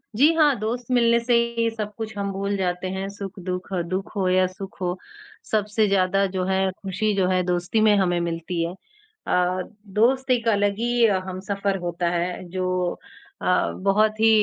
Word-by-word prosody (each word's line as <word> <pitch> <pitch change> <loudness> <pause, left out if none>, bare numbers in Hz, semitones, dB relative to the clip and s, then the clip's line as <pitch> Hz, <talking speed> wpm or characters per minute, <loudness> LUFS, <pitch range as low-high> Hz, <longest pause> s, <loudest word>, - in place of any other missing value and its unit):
जी 290 +8 +6
हाँ, 300 -4 +4
दोस्त 235 +3 -3
मिलने 235 -1 +4
से 240 +1 0 0.2
ही 230 0 +2
सब 210 -1 -4
कुछ 220 -2 -6
हम 200 0 -2
भूल 200 +1 -2
जाते 180 0 -1
हैं, 190 +1 -3
सुख-दुख, 195 -2 -6 0.2
दुख 190 +3 -4
हो 190 -2 +1
या 185 0 +4
सुख 190 +1 -10
हो। 180 0 -1 0.5
सबसे 215 0 +2
ज़्यादा 195 0 +2
जो 185 - 0
है 190 0 +1
खुशी 200 +2 -1
जो 190 -2 +2
है 185 -1 +2
दोस्ती 175 +4 0
में 215 -1 +5
हमें 175 -3 +2
मिलती 170 +1 -3
है। 170 - -3 0.5
अ, 180 +1 +1 0.3
दोस्त 255 +6 +2
एक 235 -2 +1
अलग 205 -2 +2
ही 240 0 +3
ह 195 -3 +2
हमसफ़र 195 +1 -2
होता 175 0 -1
है। 175 +1 -2
जो 185 -1 -1 0.5
अ, - - -5 0.4
बहुत 215 +2 +3
ही 225 0 +5
195 Hz, 180 wpm, -24 LUFS, 185-215 Hz, 0.5 s, जी